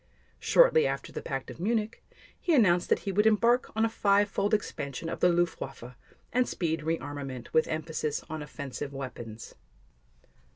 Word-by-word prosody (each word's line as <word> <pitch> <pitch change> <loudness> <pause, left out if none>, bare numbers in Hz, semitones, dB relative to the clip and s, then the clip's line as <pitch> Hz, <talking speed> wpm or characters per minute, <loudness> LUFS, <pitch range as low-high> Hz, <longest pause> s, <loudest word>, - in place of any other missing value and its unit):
Shortly 330 - +5
after 140 +1 -4
the - - -5
Pact 135 -1 -4
of - - -12
Munich, 220 +3 -1 0.4
he 345 -3 +2
announced 180 -8 +4
that - - +2
he 200 - 0
would 210 +3 +3
embark 235 +3 +3
on 220 +1 +3
a - - +1
five 205 -1 +3
fold 200 +1 -1
expansion 165 - -2
of - - -4
the 180 - +5
Luftwaffe, 165 -8 -2 0.4
and 250 0 +2
speed 165 -2 -1
rearmament 145 -5 -4
with 160 - +4
emphasis 155 -1 -3
on 155 0 -5
offensive 140 -1 -6
weapons. 120 -5 -7
165 Hz, 160 wpm, -29 LUFS, 140-210 Hz, 0.4 s, Shortly